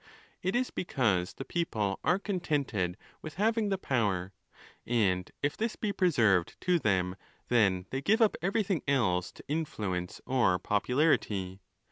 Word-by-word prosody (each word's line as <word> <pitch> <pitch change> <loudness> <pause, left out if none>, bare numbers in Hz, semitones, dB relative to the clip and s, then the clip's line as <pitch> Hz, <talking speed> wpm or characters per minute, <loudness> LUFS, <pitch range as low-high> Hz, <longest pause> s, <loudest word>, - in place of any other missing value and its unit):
It 185 +4 -1
is 250 +1 0
because 105 - 0
the 135 - -7
people 110 - -1
are 180 - +3
contented 145 - -1 0.2
with 155 - -8
having 220 +2 +1
the 195 - 0
'power; 100 - -1 0.5
and 95 -7 +1
if 145 - +1
'this 225 +1 -2
be 210 -2 -2
preserved 115 - +2
to 180 -1 +2
them, 95 - +1 0.3
then 95 -6 +3
they 135 - -2
give 215 - +3
up 220 -3 +4
everything 195 -2 0
else 105 -11 +1
to - - -13
influence 105 - -3
or 120 -9 +2
popularity. 105 - 0
125 Hz, 140 wpm, -30 LUFS, -, 0.5 s, up